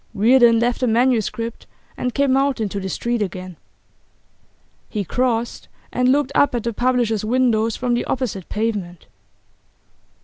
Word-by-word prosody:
Reardon 235 Hz, +2 st, +5 dB
left 240 Hz, +1 st, 0 dB
the 255 Hz, -, +1 dB
manuscript, 230 Hz, -1 st, 0 dB, 0.3 s
and 250 Hz, -, -2 dB
came 275 Hz, -2 st, +2 dB
out 275 Hz, -1 st, +1 dB
into 205 Hz, -2 st, -2 dB
the 190 Hz, 0 st, -4 dB
street 235 Hz, +3 st, -2 dB
again. 185 Hz, -2 st, -5 dB, 1.3 s
He 210 Hz, -3 st, -2 dB
crossed, 240 Hz, +3 st, -1 dB, 0.3 s
and 250 Hz, 0 st, +3 dB
looked 285 Hz, -1 st, +1 dB
up 285 Hz, -3 st, +3 dB
at 235 Hz, -, -2 dB
the 235 Hz, -, -2 dB
publishers' 240 Hz, -3 st, 0 dB
windows 230 Hz, -1 st, +1 dB
from 250 Hz, -1 st, -1 dB
the 240 Hz, -, 0 dB
opposite 225 Hz, -9 st, -3 dB
pavement. 205 Hz, -6 st, -3 dB
235 Hz, 140 wpm, -21 LUFS, 215-250 Hz, 1.3 s, Reardon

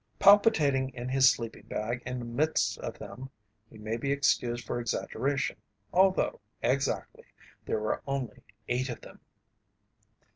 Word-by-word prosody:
Palpitating 160 Hz, -, +5 dB
in 125 Hz, 0 st, -5 dB
his 135 Hz, 0 st, +6 dB
sleeping 115 Hz, -1 st, -4 dB
bag 120 Hz, +3 st, -3 dB
in 125 Hz, 0 st, -3 dB
the 120 Hz, -, -5 dB
midst 120 Hz, -4 st, 0 dB
of -, -, -5 dB
them, 130 Hz, +2 st, -9 dB, 0.4 s
he 110 Hz, -, -14 dB
may 110 Hz, +2 st, -3 dB
be 140 Hz, +4 st, -2 dB
excused 120 Hz, -4 st, +1 dB
for 120 Hz, -, -2 dB
exaggeration, 135 Hz, +3 st, -1 dB, 0.4 s
although, 190 Hz, -, +3 dB, 0.2 s
exactly, 135 Hz, +3 st, -1 dB, 0.4 s
there -, -, 0 dB
were 110 Hz, 0 st, -1 dB
only 135 Hz, -5 st, -3 dB, 0.3 s
eight 125 Hz, +2 st, 0 dB
of 120 Hz, -, -6 dB
them. -, -, -13 dB
130 Hz, 140 wpm, -29 LUFS, 120-140 Hz, 0.4 s, his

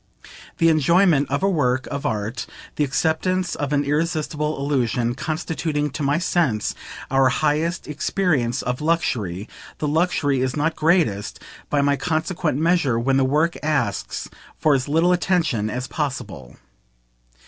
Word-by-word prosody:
The 165 Hz, -, +4 dB
enjoyment 160 Hz, -1 st, +3 dB
of 140 Hz, +6 st, -1 dB
a -, -, +4 dB
work 130 Hz, -8 st, +1 dB
of 140 Hz, 0 st, -2 dB
art, 105 Hz, +3 st, -3 dB, 0.3 s
the 150 Hz, -, +1 dB
acceptance 165 Hz, +6 st, 0 dB
of 145 Hz, -1 st, -3 dB
an 145 Hz, -1 st, +2 dB
irresistible 150 Hz, 0 st, -1 dB
illusion, 125 Hz, -4 st, 0 dB
constituting, 155 Hz, +1 st, -2 dB
to 150 Hz, -, -5 dB
my 145 Hz, +2 st, +2 dB
sense, 165 Hz, -, 0 dB, 0.4 s
our 135 Hz, -1 st, +4 dB
highest 155 Hz, +5 st, 0 dB
experience 150 Hz, -5 st, 0 dB
of 125 Hz, +2 st, -3 dB
"luxury," 115 Hz, -, -1 dB, 0.3 s
the 150 Hz, -, -2 dB
luxury 150 Hz, -4 st, +1 dB
is 130 Hz, -1 st, -1 dB
not 160 Hz, +2 st, 0 dB
greatest, 155 Hz, -, +1 dB, 0.3 s
by 145 Hz, -, +2 dB
my 140 Hz, 0 st, +2 dB
consequent 160 Hz, 0 st, -1 dB
measure, 160 Hz, -6 st, +2 dB
when 130 Hz, +3 st, +1 dB
the 135 Hz, -, +3 dB
work 150 Hz, +5 st, +1 dB
asks 145 Hz, -9 st, -1 dB, 0.3 s
for 155 Hz, -, +3 dB
as 130 Hz, 0 st, 0 dB
little 165 Hz, +4 st, +3 dB
attention 170 Hz, -, +1 dB
as 125 Hz, +3 st, -3 dB
possible. 110 Hz, -, -5 dB
145 Hz, 140 wpm, -22 LUFS, 130-165 Hz, 0.4 s, The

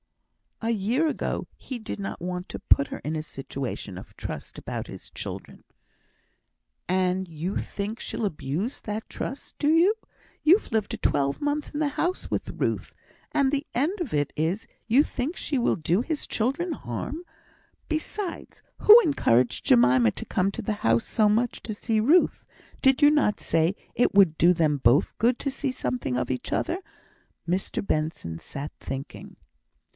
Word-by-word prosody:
"A 230 Hz, -, +1 dB
year 230 Hz, +9 st, +1 dB
ago 305 Hz, -, -2 dB
he 260 Hz, -, -6 dB
did 220 Hz, -, -6 dB
not 195 Hz, -, -5 dB
want 180 Hz, +1 st, -4 dB
to -, -, -6 dB
put 140 Hz, -, +4 dB
her -, -, -6 dB
in 155 Hz, +2 st, -3 dB
a 155 Hz, -, -1 dB
situation 135 Hz, -9 st, -5 dB
of -, -, -13 dB
trust -, -, -6 dB
about -, -, -5 dB
his -, -, -10 dB
children." -, -, -7 dB, 1.2 s
"And 185 Hz, 0 st, +1 dB
you 170 Hz, +4 st, -3 dB
think 210 Hz, +3 st, -4 dB
she'll 225 Hz, -, -3 dB
abuse 185 Hz, -, -3 dB
that 215 Hz, +1 st, -4 dB
trust, 275 Hz, -, -6 dB
do 295 Hz, -, +2 dB
you? 355 Hz, +6 st, +5 dB, 0.5 s
You've 360 Hz, +8 st, +4 dB
lived 220 Hz, -2 st, 0 dB
a -, -, -9 dB
twelvemonth 290 Hz, -, 0 dB
in 295 Hz, -, -2 dB
the 310 Hz, -, +2 dB
house 355 Hz, +6 st, -2 dB
with -, -, -2 dB
Ruth, -, -, -1 dB, 0.4 s
and 275 Hz, -2 st, +2 dB
the 285 Hz, +1 st, -1 dB
end 330 Hz, -, 0 dB
of 310 Hz, -, -3 dB
it 145 Hz, -1 st, 0 dB
is, 165 Hz, +7 st, -1 dB, 0.2 s
you 250 Hz, +6 st, +5 dB
think 285 Hz, +4 st, -3 dB
she 290 Hz, -, -2 dB
will 245 Hz, -, +2 dB
do 170 Hz, +5 st, +1 dB
his 310 Hz, +3 st, -2 dB
children 280 Hz, +10 st, 0 dB
harm! 270 Hz, -, -5 dB, 0.6 s
Besides, 335 Hz, +4 st, -4 dB, 0.2 s
who 435 Hz, +3 st, +10 dB
encouraged 130 Hz, -, +2 dB
Jemima 125 Hz, -2 st, +5 dB
to -, -, -7 dB
come 190 Hz, +1 st, +1 dB
to 230 Hz, -, -5 dB
the 215 Hz, -, 0 dB
house 115 Hz, 0 st, +3 dB
so 215 Hz, -2 st, +2 dB
much 230 Hz, +3 st, +1 dB
to 220 Hz, -, -4 dB
see 220 Hz, 0 st, 0 dB
Ruth? 305 Hz, +11 st, +3 dB, 0.4 s
Did 265 Hz, +1 st, +5 dB
you 290 Hz, -, +8 dB
not 295 Hz, -9 st, +2 dB
say 165 Hz, +4 st, +1 dB, 0.2 s
it 245 Hz, -, +3 dB
would 185 Hz, -6 st, +6 dB
do 175 Hz, +2 st, +6 dB
them 155 Hz, -4 st, +2 dB
both 130 Hz, +2 st, +3 dB
good 240 Hz, +2 st, +3 dB
to 275 Hz, -, -2 dB
see 270 Hz, 0 st, -2 dB
something 245 Hz, -, -2 dB
of 125 Hz, -, -1 dB
each 125 Hz, -, -4 dB
other?" 355 Hz, -, 0 dB, 0.7 s
Mr 185 Hz, +3 st, -1 dB
Benson 155 Hz, -, -2 dB
sat 145 Hz, -, -7 dB
thinking. 135 Hz, +1 st, -7 dB
215 Hz, 170 wpm, -26 LUFS, -, 1.2 s, who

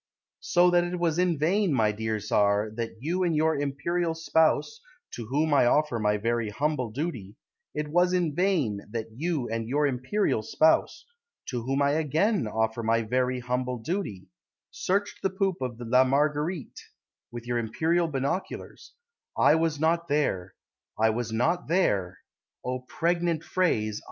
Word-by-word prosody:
So 175 Hz, 0 st, +3 dB
that 175 Hz, 0 st, +4 dB
it 175 Hz, +1 st, -3 dB
was 170 Hz, -1 st, 0 dB
in 180 Hz, -3 st, +2 dB
vain, 185 Hz, +5 st, +1 dB
my 110 Hz, -5 st, +2 dB
dear 110 Hz, +1 st, -2 dB
Tsar, 105 Hz, 0 st, +1 dB
That 115 Hz, +1 st, -5 dB
you 170 Hz, +6 st, -1 dB
and 175 Hz, -3 st, +1 dB
your 160 Hz, +1 st, +2 dB
Imperial 160 Hz, +4 st, -1 dB
spouse 160 Hz, -, +1 dB, 0.3 s
(To 115 Hz, -3 st, -7 dB
whom 150 Hz, +5 st, +1 dB
I 135 Hz, -4 st, +5 dB
offer 150 Hz, -2 st, +2 dB
my 105 Hz, -1 st, +1 dB
very 115 Hz, +1 st, -1 dB
humble 140 Hz, +1 st, -1 dB
duty), 120 Hz, -, -5 dB, 0.4 s
It 150 Hz, 0 st, -2 dB
was 175 Hz, +4 st, +2 dB
in 175 Hz, -4 st, +1 dB
vain 150 Hz, -, +1 dB
That 115 Hz, 0 st, -5 dB
you 150 Hz, -2 st, -2 dB
and 115 Hz, 0 st, -3 dB
your 145 Hz, +3 st, +2 dB
Imperial 130 Hz, -, 0 dB
spouse 155 Hz, +8 st, +2 dB, 0.4 s
(To 125 Hz, -2 st, -3 dB
whom 135 Hz, +4 st, 0 dB
I 140 Hz, -, +3 dB
again 160 Hz, -, +1 dB
offer 110 Hz, +1 st, -1 dB
my 115 Hz, 0 st, +1 dB
very 125 Hz, +2 st, 0 dB
humble 125 Hz, 0 st, -2 dB
duty) 115 Hz, -, -4 dB, 0.5 s
Searched 200 Hz, +2 st, -2 dB
the 195 Hz, -, +1 dB
poop 190 Hz, -1 st, -1 dB
of 125 Hz, -2 st, -4 dB
La 125 Hz, +2 st, +4 dB
Marguerite 150 Hz, +4 st, -1 dB, 0.5 s
With 120 Hz, -1 st, -8 dB
your 120 Hz, 0 st, -1 dB
Imperial 160 Hz, +10 st, 0 dB
binoculars; 140 Hz, +6 st, -4 dB, 0.4 s
I -, -, +5 dB
was 160 Hz, -2 st, +1 dB
not 170 Hz, +2 st, +1 dB
there, 95 Hz, -11 st, -1 dB, 0.4 s
I 110 Hz, +1 st, +3 dB
was 115 Hz, 0 st, -3 dB
not 165 Hz, +11 st, 0 dB
there, 100 Hz, -, +1 dB, 0.5 s
(O 125 Hz, 0 st, -2 dB
pregnant 170 Hz, +4 st, -1 dB
phrase!) 110 Hz, -, 0 dB
140 Hz, 155 wpm, -27 LUFS, 115-170 Hz, 0.5 s, I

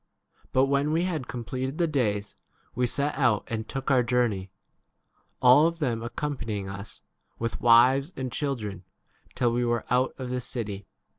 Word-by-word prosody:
5 -, -, -28 dB
But 130 Hz, +1 st, +4 dB
when 140 Hz, +2 st, +1 dB
we 165 Hz, +2 st, +2 dB
had 160 Hz, -8 st, -2 dB
completed 130 Hz, +3 st, -4 dB
the 175 Hz, -, +2 dB
days, 105 Hz, -10 st, -1 dB, 0.4 s
we 125 Hz, 0 st, +1 dB
set 140 Hz, +4 st, -1 dB
out 120 Hz, -6 st, +2 dB
and 110 Hz, -1 st, -4 dB
took 135 Hz, 0 st, -2 dB
our 130 Hz, -2 st, +5 dB
journey, 115 Hz, -6 st, 0 dB, 0.9 s
all 130 Hz, +5 st, +7 dB
of 170 Hz, 0 st, -3 dB
them 125 Hz, -8 st, -1 dB
accompany 120 Hz, -2 st, -3 dB
ing 95 Hz, -1 st, -5 dB
us, 100 Hz, +2 st, -9 dB, 0.4 s
with 115 Hz, 0 st, -3 dB
wives 125 Hz, +6 st, +5 dB
and 130 Hz, -2 st, -3 dB
children, 110 Hz, -, -3 dB, 0.5 s
till 120 Hz, -2 st, +2 dB
[we 120 Hz, +1 st, +1 dB
were] 120 Hz, -1 st, 0 dB
out 125 Hz, +1 st, +2 dB
of 125 Hz, -2 st, -5 dB
the 125 Hz, 0 st, -1 dB
city. 105 Hz, -6 st, -5 dB
125 Hz, 170 wpm, -27 LUFS, 115-140 Hz, 0.9 s, all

